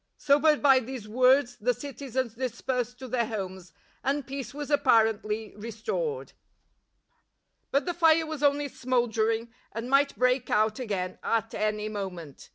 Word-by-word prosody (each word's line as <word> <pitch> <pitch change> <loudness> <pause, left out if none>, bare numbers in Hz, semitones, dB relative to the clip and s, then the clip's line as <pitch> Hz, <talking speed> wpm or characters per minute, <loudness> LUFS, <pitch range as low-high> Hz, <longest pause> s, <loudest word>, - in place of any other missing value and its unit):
Sobered 295 +1 +3
by 270 -2 +7
these 250 -3 -7
words, 250 +2 +3
the 245 +3 0
citizens 260 -4 -4
dis 250 -1 -4
persed 250 -1 -2
to 260 0 -8
their 235 -2 0
homes, 190 -5 -6 0.3
and 280 0 0
peace 270 -1 -6
was 295 +1 -6
appai 225 -6 +4
ently 215 +1 -5
restored.,, 230 - -4
aSr;::::::::;/::: - - -20
V - - -35 1.3
But 280 - +1
the 350 - -1
fire 325 -1 +4
was 310 -2 -6
only 285 0 +2
smouldering 230 -3 0 0.2
and 230 +3 -5
might 280 +1 +3
break 250 0 +2
out 215 +1 +2
again 195 -7 -3
at 225 0 -1
any 215 0 -1
moment. 185 -8 -7
245 Hz, 160 wpm, -28 LUFS, 220-280 Hz, 1.3 s, by